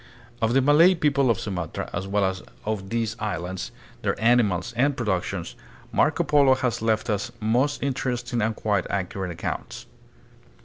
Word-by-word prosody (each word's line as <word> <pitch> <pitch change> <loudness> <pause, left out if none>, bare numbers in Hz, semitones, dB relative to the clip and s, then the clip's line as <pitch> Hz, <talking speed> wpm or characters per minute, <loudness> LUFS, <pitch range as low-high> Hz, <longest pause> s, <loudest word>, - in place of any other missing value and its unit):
Of 115 +2 +2
the 135 - +4
Malay 160 +6 +6
people 140 -5 +2
of 115 - +2
Sumatra, 90 -6 -4
as 95 +2 -3
well 100 0 +1
as 95 0 -2 0.2
of 105 -3 -3
these 115 -1 -1
islands, 95 -3 -4 0.3
their - - -1
animals 110 -3 +2
and 140 +4 +2
productions, 100 -7 -2 0.4
Marco - - +2
Polo 140 -3 +5
has 125 -3 -1
left 110 0 +1
us 105 -3 -1
most 125 +7 +1
interesting 125 -3 -1
and 110 +1 0
quite 100 -4 -1
accurate 95 -1 -2
accounts. 85 - -5
110 Hz, 150 wpm, -25 LUFS, 95-130 Hz, 0.4 s, Malay